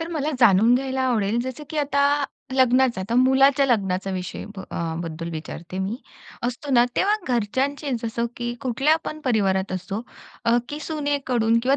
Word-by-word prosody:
तर 330 Hz, -, -4 dB
मला 310 Hz, -2 st, -1 dB
जाणून 225 Hz, +2 st, +6 dB
घ्यायला 265 Hz, 0 st, -1 dB
आवडेल, 230 Hz, -3 st, +1 dB
जसं 260 Hz, +4 st, -6 dB
की 310 Hz, -, -3 dB
आता 285 Hz, 0 st, +2 dB, 0.3 s
लग्नाचं, 255 Hz, -3 st, +3 dB
आता 205 Hz, +5 st, -3 dB
मुलाच्या 265 Hz, +2 st, +5 dB
लग्नाचा 195 Hz, -6 st, 0 dB
विषय 185 Hz, -1 st, -5 dB
ब -, -, -5 dB
अ, 165 Hz, -1 st, -3 dB
बद्दल 165 Hz, 0 st, -5 dB
विचारते 165 Hz, +3 st, -7 dB
मी. 195 Hz, +5 st, -2 dB, 0.5 s
असतो 250 Hz, +4 st, -3 dB
ना 240 Hz, -1 st, +6 dB
तेव्हा 410 Hz, +2 st, +3 dB
घरच्यांचे 265 Hz, +5 st, -1 dB
जसं 235 Hz, +1 st, -1 dB
की 240 Hz, 0 st, -3 dB
कुठल्या 270 Hz, +5 st, +2 dB
पण 310 Hz, 0 st, -5 dB
परिवारात 195 Hz, -6 st, +1 dB
असो 195 Hz, +3 st, -4 dB, 0.4 s
अ, 235 Hz, 0 st, +4 dB
की 295 Hz, 0 st, -5 dB
सुनेकडून 275 Hz, -8 st, 0 dB
किंवा 270 Hz, +2 st, +3 dB
245 Hz, 165 wpm, -23 LUFS, 200-280 Hz, 0.5 s, जाणून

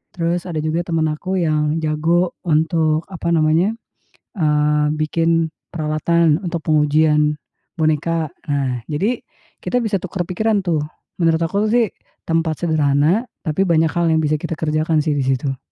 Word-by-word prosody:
Terus, 170 Hz, +1 st, -1 dB
ada 170 Hz, -3 st, -4 dB
juga 155 Hz, +2 st, 0 dB
teman 165 Hz, -2 st, 0 dB
aku 180 Hz, +5 st, -3 dB
yang 155 Hz, -2 st, +1 dB
jago 165 Hz, +3 st, +1 dB
untuk 160 Hz, 0 st, +2 dB
apa 170 Hz, -2 st, -3 dB
namanya, 160 Hz, +6 st, +2 dB, 0.6 s
eee, 150 Hz, -1 st, +2 dB
bikin 165 Hz, +1 st, +1 dB, 0.2 s
peralatan 160 Hz, 0 st, +1 dB
untuk 170 Hz, -1 st, -3 dB
pengujian 150 Hz, 0 st, +3 dB, 0.4 s
boneka. 155 Hz, +1 st, 0 dB, 0.2 s
Nah, 130 Hz, -4 st, -1 dB
jadi 205 Hz, +12 st, -1 dB, 0.4 s
kita 250 Hz, -, 0 dB
bisa 215 Hz, -3 st, 0 dB
tukar 185 Hz, 0 st, -3 dB
pikiran 210 Hz, +3 st, +1 dB
tuh. 160 Hz, -4 st, +1 dB, 0.4 s
Menurut 165 Hz, -1 st, +3 dB
aku 200 Hz, +6 st, 0 dB
sih 235 Hz, -3 st, +3 dB, 0.4 s
tempat 165 Hz, -1 st, 0 dB
sederhana, 155 Hz, -, +2 dB, 0.2 s
tapi 160 Hz, +5 st, 0 dB
banyak 165 Hz, -2 st, +3 dB
hal 170 Hz, -1 st, 0 dB
yang 160 Hz, -, +2 dB
bisa 155 Hz, 0 st, +1 dB
kita 165 Hz, +1 st, -4 dB
kerjakan 155 Hz, 0 st, +1 dB
sih 150 Hz, 0 st, 0 dB
di 135 Hz, -, 0 dB
situ. 135 Hz, +1 st, -1 dB
160 Hz, 145 wpm, -19 LUFS, 150-170 Hz, 0.6 s, pengujian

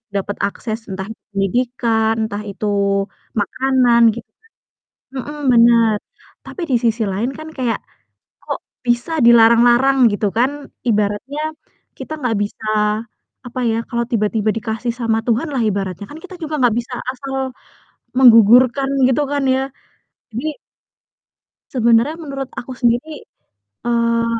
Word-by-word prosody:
dapat 200 Hz, +1 st, -2 dB
akses, 220 Hz, +2 st, -5 dB
entah 190 Hz, 0 st, -5 dB
itu 225 Hz, -, -12 dB
pendidikan, 225 Hz, +2 st, +1 dB
entah 205 Hz, 0 st, -5 dB
itu 200 Hz, +2 st, -5 dB, 0.7 s
makanan, 255 Hz, +1 st, +2 dB
gitu 235 Hz, -, -9 dB
kan 445 Hz, -, -41 dB, 0.8 s
mhm, 295 Hz, 0 st, -7 dB
benar. 230 Hz, -2 st, +5 dB, 0.5 s
Tapi, 365 Hz, -, -7 dB
di 250 Hz, -, +4 dB
sisi 225 Hz, 0 st, +1 dB
lain 225 Hz, +7 st, -1 dB
kan 310 Hz, 0 st, -9 dB
kayak 250 Hz, -6 st, -2 dB, 0.6 s
kok -, -, -4 dB, 0.3 s
bisa 240 Hz, +6 st, 0 dB, 0.2 s
dilarang-larang 240 Hz, +3 st, +6 dB
gitu 205 Hz, +1 st, -1 dB
kan, 255 Hz, +3 st, +3 dB, 0.4 s
ibaratnya 210 Hz, +7 st, -1 dB, 0.6 s
kita -, -, -7 dB
nggak 245 Hz, -6 st, -1 dB
bisa, 205 Hz, +2 st, -6 dB, 0.8 s
apa 250 Hz, +1 st, -5 dB
ya, 225 Hz, -, 0 dB
kalau 235 Hz, -1 st, 0 dB
tiba-tiba 215 Hz, 0 st, 0 dB
dikasih 225 Hz, +1 st, -3 dB
sama 225 Hz, -1 st, +1 dB
Tuhan 240 Hz, +7 st, +1 dB
lah, 255 Hz, -, 0 dB
ibaratnya 195 Hz, -1 st, -3 dB
kan 305 Hz, -, -9 dB
kita 375 Hz, -, -10 dB
juga 310 Hz, 0 st, -4 dB
nggak 235 Hz, -3 st, +4 dB
bisa 240 Hz, +1 st, -5 dB, 0.2 s
asal 270 Hz, +1 st, -7 dB, 0.8 s
menggugurkan, 245 Hz, +2 st, +6 dB, 0.2 s
gitu 265 Hz, +3 st, +2 dB
kan 285 Hz, -1 st, 0 dB
ya. 265 Hz, -, +1 dB, 0.7 s
Jadi 290 Hz, +7 st, -4 dB, 1.1 s
sebenarnya 235 Hz, +4 st, +3 dB
menurut 275 Hz, -3 st, -5 dB
aku 255 Hz, -, -6 dB
sendiri, 245 Hz, +6 st, 0 dB, 0.6 s
eee, 235 Hz, -1 st, +1 dB
235 Hz, 130 wpm, -18 LUFS, 220-265 Hz, 1.1 s, dilarang-larang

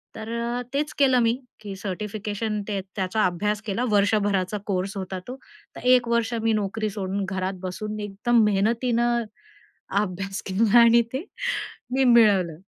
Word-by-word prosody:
तर 235 Hz, +2 st, -3 dB
तेच 295 Hz, +1 st, -1 dB
केलं 260 Hz, -3 st, +5 dB
मी, 230 Hz, 0 st, +3 dB, 0.3 s
की 200 Hz, -2 st, -7 dB
सर्टिफिकेशन 210 Hz, +2 st, -4 dB
ते 200 Hz, -2 st, -1 dB, 0.2 s
त्याचा 195 Hz, +1 st, 0 dB
अभ्यास 205 Hz, +4 st, -1 dB
केला 210 Hz, +3 st, -1 dB
वर्षभराचा 200 Hz, -1 st, +2 dB
कोर्स 195 Hz, +1 st, -2 dB
होता 190 Hz, -1 st, -4 dB
तो. 250 Hz, -, -5 dB, 0.4 s
तर -, -, -9 dB
1 240 Hz, -2 st, +1 dB
वर्ष 235 Hz, 0 st, +1 dB
मी 225 Hz, -1 st, +2 dB
नोकरी 215 Hz, +1 st, -1 dB
सोडून 195 Hz, -1 st, -3 dB
घरात 190 Hz, 0 st, -2 dB
बसून, 210 Hz, +4 st, -4 dB
एकदम 210 Hz, +3 st, +1 dB
मेहनतीनं 235 Hz, +3 st, +1 dB, 0.8 s
अभ्यास 195 Hz, 0 st, -4 dB
केला 220 Hz, +4 st, +4 dB
आणि 235 Hz, 0 st, +7 dB
ते 275 Hz, +6 st, -2 dB, 0.7 s
मी 270 Hz, -, +3 dB
मिळवलं. 205 Hz, -9 st, +4 dB
210 Hz, 140 wpm, -24 LUFS, 195-235 Hz, 0.8 s, आणि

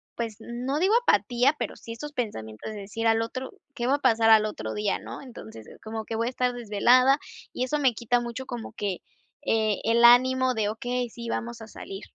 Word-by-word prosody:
pues 230 Hz, -3 st, -4 dB
no 245 Hz, +5 st, -3 dB
digo 385 Hz, +6 st, +3 dB
apatía, 245 Hz, -, +3 dB
pero -, -, -3 dB
sí 230 Hz, -, -10 dB
estos 295 Hz, +6 st, -7 dB
pensamientos 160 Hz, -, -5 dB
de 215 Hz, -, -7 dB
decir 215 Hz, +3 st, -5 dB
al 225 Hz, 0 st, +3 dB
otro 255 Hz, +3 st, -5 dB, 0.2 s
¿qué 240 Hz, -, -3 dB
va 275 Hz, -, +4 dB
a -, -, -4 dB
pasar 230 Hz, -4 st, +3 dB
al 215 Hz, -1 st, +7 dB
otro 215 Hz, -, -4 dB
día, 210 Hz, -2 st, 0 dB
¿no?, -, -, -8 dB
entonces 115 Hz, -, -11 dB, 0.2 s
como 220 Hz, 0 st, -5 dB
que 225 Hz, -, -4 dB
voy 230 Hz, +1 st, 0 dB
a -, -, +1 dB
estar 250 Hz, -1 st, 0 dB
desvelada, 245 Hz, +4 st, +4 dB, 0.3 s
y -, -, -2 dB
eso 300 Hz, +4 st, -1 dB
me 265 Hz, -4 st, +3 dB
quita 240 Hz, +2 st, +1 dB
mucho 240 Hz, +2 st, -5 dB
como 240 Hz, -3 st, -6 dB
que, 195 Hz, -4 st, -3 dB, 0.4 s
eh, 215 Hz, -2 st, +1 dB
el 230 Hz, +1 st, +3 dB
ánimo 255 Hz, +1 st, +5 dB
de, 215 Hz, -2 st, 0 dB
okey, 245 Hz, +3 st, -3 dB
sí, 235 Hz, +1 st, -8 dB
vamos 235 Hz, 0 st, -4 dB
a 220 Hz, -, -9 dB
salir. 195 Hz, -2 st, -9 dB
235 Hz, 210 wpm, -26 LUFS, 220-250 Hz, 0.4 s, al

